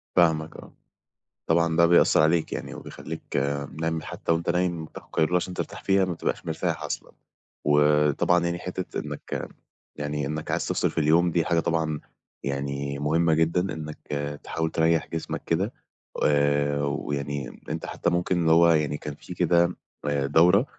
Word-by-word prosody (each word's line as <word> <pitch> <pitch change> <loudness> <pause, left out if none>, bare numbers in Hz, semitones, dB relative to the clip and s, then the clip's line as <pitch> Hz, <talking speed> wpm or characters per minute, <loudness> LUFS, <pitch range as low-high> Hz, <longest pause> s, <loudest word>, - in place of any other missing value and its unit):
فاهمك، 80 -2 +2
آه. - - -12 0.7
طبعًا 85 0 +3
ده 85 - +7
بيأثّر 85 -2 +5
عليك 80 +1 +2
يعني - - -5
وبيخلّيك 80 - -8 0.6
نايم 80 0 0
ل - - -11
حتى - - -3
وأنت 85 +1 0
نايم 85 -2 0
بتاخد - - -12
قيلولة 80 +3 +2
عشان 90 +1 0
ترتاح - - -5
فيها 95 -1 +3
ما 90 - -2
بتبقاش 85 - -3
مرتاح 80 +1 -2
أصلًا، - - -5 0.5
وطبعًا 75 +3 +3
يعني 85 0 -1
حِتّة 90 +1 -4
إنك - - -5 0.5
يعني 75 0 -2
إنك 75 +1 -4
عايز - - 0
تفصِل - - +1
في - - -18
اليوم 80 +3 +4
دي 85 -1 +1
حاجة 85 +1 +2
طبعًا 80 -2 0 0.4
يعني 70 0 -3
مهمّة 80 +3 +2
جدًا، 85 +4 +1
إنك 75 -1 -7 0.4
تحاول 80 0 -2
تريّح 80 0 +2
جسمك 80 -1 -4
كده 95 +8 0 0.5
آآ 70 0 +2
ويعني 70 -2 -3
أنت 80 +2 -3
حتى - - -1
ممكن 90 +1 0
اللي 80 -1 +3
هو 85 +1 +6
يعني 75 -2 +1
كان 75 -1 -6
في 90 - -10
كده 85 0 +3 0.3
آآ 70 -1 0
دورة 90 - +5
80 Hz, 160 wpm, -26 LUFS, 75-85 Hz, 0.7 s, ده